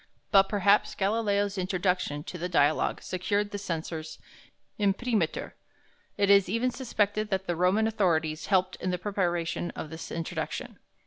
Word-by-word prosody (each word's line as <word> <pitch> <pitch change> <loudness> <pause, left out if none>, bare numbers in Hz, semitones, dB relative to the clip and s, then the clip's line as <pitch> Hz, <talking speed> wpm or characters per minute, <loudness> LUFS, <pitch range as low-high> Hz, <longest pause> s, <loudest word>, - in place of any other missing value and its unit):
But 195 -1 +6
perhaps 205 0 +3
Galileo's 205 -1 0
introduction 180 -5 -1
to 180 - -7
the 180 +2 -3
"Dialogue" 145 -2 +2
secured 205 +3 -1
the 205 - -4
censor's 160 -3 -5 0.6
imprimatur; 205 -2 0 0.6
it 200 0 +3
is 200 -3 +5
even 230 +5 +1
suspected 215 -4 -1
that 190 -1 -1
the 175 - -1
Roman 185 +6 +3
authorities 165 -8 0
helped 185 -1 +2
in 185 - -3
the 180 - 0
preparation 175 -3 -1
of 155 - -6
this 160 +1 -7
introduction. 165 0 -4
190 Hz, 140 wpm, -28 LUFS, 175-205 Hz, 0.6 s, But